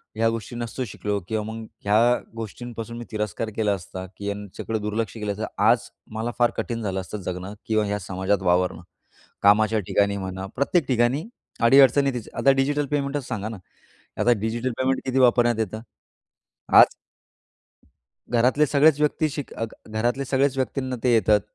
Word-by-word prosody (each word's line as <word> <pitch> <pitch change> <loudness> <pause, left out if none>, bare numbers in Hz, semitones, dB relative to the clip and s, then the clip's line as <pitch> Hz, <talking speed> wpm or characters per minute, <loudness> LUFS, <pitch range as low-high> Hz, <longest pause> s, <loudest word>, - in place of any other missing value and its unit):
ह्या 115 +1 +2
गोष्टी 115 +1 -5
नसतो 120 +2 -4
शिकलो 105 -1 -3
किंवा 110 -1 -1
मग 110 +1 -6 0.2
ह्या 105 +1 +4 0.4
गोष्टींपासून 115 +1 -7
मी 120 - -7
तिरस्कार 105 +1 -3
केला 105 -2 +1
असता, 95 0 -6
की 100 - -6
याच्याकडं 105 +2 -4
दुर्लक्ष 105 0 -2
केलं 105 -3 -3
तर 110 - -2 0.2
आज - - +4 0.3
मला 115 +2 -2
फार 120 -1 +4
कठीण 115 -1 -3
झालं 95 -2 -2
असतं 95 +3 -7
जगणं 90 +2 -5
किंवा 110 -1 +2
ह्या 105 0 -2
समाजात 95 +2 -1
वावरणं. 90 -1 +1 0.6
कामाच्या 110 +2 +4
ठिकाणी 100 0 +2
म्हणा, 95 0 -5
प्रत्येक 140 +2 +1
ठिकाणी 125 +4 +2 0.4
अडीअडचणी 135 +2 +6
तिचं 120 -3 -7
आता 135 - +5
डिजिटल 145 +2 +1
पेमेंटच 140 -2 -1
सांगा 110 -2 -3
ना 110 - -7 0.6
आता 120 - +4
डिजिटल 115 +4 -1
पेमेंट 130 0 +1
किती 130 0 0
वापरण्यात 120 -2 +4
येतं 110 0 -2 1.0
आज - - +10 1.5
घरातले 125 +5 +3
सगळेच 150 +1 +4
व्यक्ती 150 +1 +1
शिक 145 -1 -6
अग 115 -1 -5
घरातले 120 +5 -1
सगळेच 135 +1 +1
व्यक्तींना 130 -1 -2
ते 125 -2 +3
येतं. 105 -1 +4
115 Hz, 160 wpm, -24 LUFS, 105-130 Hz, 1.5 s, आज